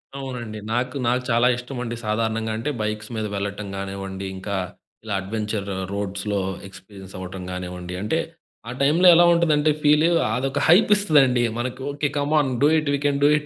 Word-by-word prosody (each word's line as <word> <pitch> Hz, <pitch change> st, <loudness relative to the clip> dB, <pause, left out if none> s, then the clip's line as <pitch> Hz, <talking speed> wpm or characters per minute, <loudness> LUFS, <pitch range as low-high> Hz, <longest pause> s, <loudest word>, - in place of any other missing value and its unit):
అవునండి. 125 Hz, -5 st, -6 dB
నాకు, 125 Hz, +2 st, -1 dB
నాకు 125 Hz, +1 st, +2 dB
చాలా 120 Hz, +1 st, +4 dB
ఇష్టమండి. 125 Hz, -1 st, -5 dB
సాధారణంగా 110 Hz, +1 st, -1 dB
అంటే 115 Hz, +6 st, -3 dB
బైక్స్ 105 Hz, 0 st, -3 dB
మీద 110 Hz, -1 st, -2 dB
వెళ్ళటం 100 Hz, +1 st, -4 dB
కానివ్వండి, 95 Hz, 0 st, -5 dB
ఇంకా 100 Hz, +2 st, -4 dB, 0.5 s
ఇలా 110 Hz, -2 st, -4 dB
అడ్వెంచర్ 105 Hz, 0 st, -3 dB, 0.3 s
రోడ్స్‌లో 100 Hz, 0 st, -2 dB, 0.3 s
ఎక్స్పీరియన్స్ 95 Hz, -1 st, -13 dB
అవ్వటం 95 Hz, 0 st, -7 dB
కానివ్వండి 90 Hz, 0 st, -6 dB
అంటే 105 Hz, +11 st, 0 dB, 0.5 s
ఆ -, -, -4 dB
టైమ్‌లో 160 Hz, +6 st, +4 dB
ఎలా 175 Hz, +1 st, +6 dB
ఉంటుందంటే 155 Hz, -3 st, +3 dB
ఫీల్ 150 Hz, +1 st, +4 dB, 0.3 s
అదొక 135 Hz, +2 st, -1 dB
హైప్ 185 Hz, +7 st, +6 dB
ఇస్తదండి. 140 Hz, -11 st, +3 dB
మనకి 120 Hz, +2 st, -4 dB
"okay. 145 Hz, +1 st, -1 dB
Come 145 Hz, +1 st, -1 dB
on 140 Hz, -3 st, +1 dB
do 145 Hz, -, +6 dB
it, 155 Hz, -2 st, -1 dB
we -, -, +2 dB
can 140 Hz, -1 st, +2 dB
do -, -, +7 dB
it" 150 Hz, -, -6 dB
115 Hz, 165 wpm, -23 LUFS, 100-145 Hz, 0.5 s, do